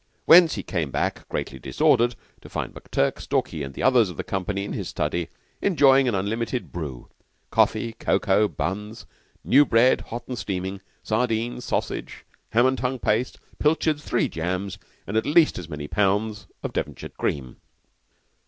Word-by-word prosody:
Thence 170 -1 +8
he - - -4
came 85 -7 -2
back, - - -2
greatly 65 - -4
disordered, 120 - +2 0.3
to - - -12
find - - -4
McTurk, 70 - -1
Stalky, 80 - -1
and 70 -1 -6
the - - -4
others 125 -6 +5
of 90 - -9
the - - -3
company, 100 +1 -2
in - - -5
his - - -4
study 80 +3 -2 0.3
enjoying 135 -8 +5
an 120 - +1
unlimited 115 +5 -2
"brew" 75 -8 -6 0.4
coffee, 115 - +2
cocoa, 105 -2 +2
buns, 105 +4 -4 0.4
new 140 +3 +6
bread 125 -1 +4
hot 120 +1 -7
and 125 -2 -4
steaming, 95 0 -4 0.2
sardine, 115 +1 -1
sausage, - - -3 0.2
ham 120 +2 +4
and 130 0 +2
tongue 130 +1 -1
paste, 115 +1 0 0.2
pilchards, 150 0 +1
three 120 - +1
jams, 90 +4 -3 0.3
and 105 - -2
at 110 - +1
least 155 - +4
as 85 -3 -9
many 75 -2 -5
pounds 105 +3 0 0.2
of - - -4
Devonshire - - -4
cream. 65 -4 -3
110 Hz, 160 wpm, -24 LUFS, 90-125 Hz, 0.4 s, Thence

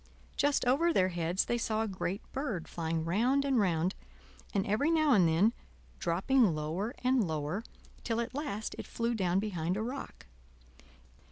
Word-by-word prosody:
Just 285 -2 +2
over 290 +8 +3
their 185 - +3
heads 175 +1 0
they 240 - 0
saw 220 -1 0
a - - -2
great 195 +1 -3
bird 245 - -3
flying 160 -1 -2
round 245 +11 +2
and 270 -3 +2
round, 180 -2 +1 0.6
and 195 -2 0
every 215 +10 +1
now 310 -3 +3
and 185 -7 +5
then, 180 +8 +3 0.5
dropping 195 - +2
lower 165 +10 -3
and 255 -1 +3
lower, 155 +6 -2 0.4
till 230 -1 -1
at 235 +1 -3
last 260 -7 -3
it - - -6
flew 235 +1 -1
down 185 -5 +1
behind 185 -3 -1
a 215 - -1
rock. 260 +4 -6
210 Hz, 165 wpm, -31 LUFS, 175-250 Hz, 0.6 s, and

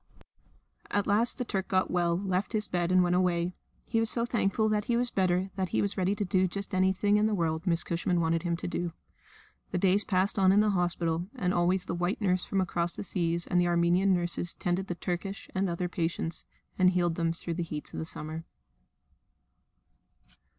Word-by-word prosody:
At 205 -1 0
last 220 +4 +2
the 250 - -2
Turk 195 -4 -2
got 185 -1 +1
well, 175 -1 +1
left 190 +2 -2
his 215 -1 +1
bed, 175 0 -1
and 185 0 +5
went 175 0 +2
away. 180 -1 +1 0.3
He 225 - 0
was 225 0 0
so 235 -1 0
thankful 220 -2 +1
that 210 -1 0
he 235 - +1
was 245 0 +1
better 185 0 +1
that 190 -2 -1
he - - 0
was 200 0 0
ready 190 +1 +1
to 205 -1 -2
do 185 +1 +2
just 200 +3 -5
anything 190 +2 +2
in 210 +1 +3
the 215 - 0
world 160 -3 0
that 185 - -2
Miss 170 0 +2
Cushman 175 +1 0
wanted 165 0 +1
him 170 -1 -1
to - - -5
do. 175 -1 -3 0.8
The - - -2
days 195 +3 +4
passed 190 +1 +1
on 190 -1 +5
in 200 - +5
the 210 0 +3
hospital, 175 -2 0
and 180 -8 0
always 180 +1 +2
the - - -3
white 175 +3 -1
nurse 185 -3 +1
from 195 - 0
across 175 -1 -1
the - - -6
seas 170 -2 0
and 180 - +2
the 175 - +2
Armenian 175 +3 +3
nurses 175 -1 0
tended 180 +2 -1
the 175 - -3
Turkish 185 +3 -4
and 190 0 0
other 175 +1 -2
patients, 165 -1 -2 0.3
and 185 0 +6
healed 175 -2 +1
them 165 0 0
through 170 0 -5
the 175 - -3
heats 155 -3 -5
of - - -4
that - - -3
summer. 160 +1 -5
180 Hz, 215 wpm, -29 LUFS, 175-195 Hz, 0.8 s, and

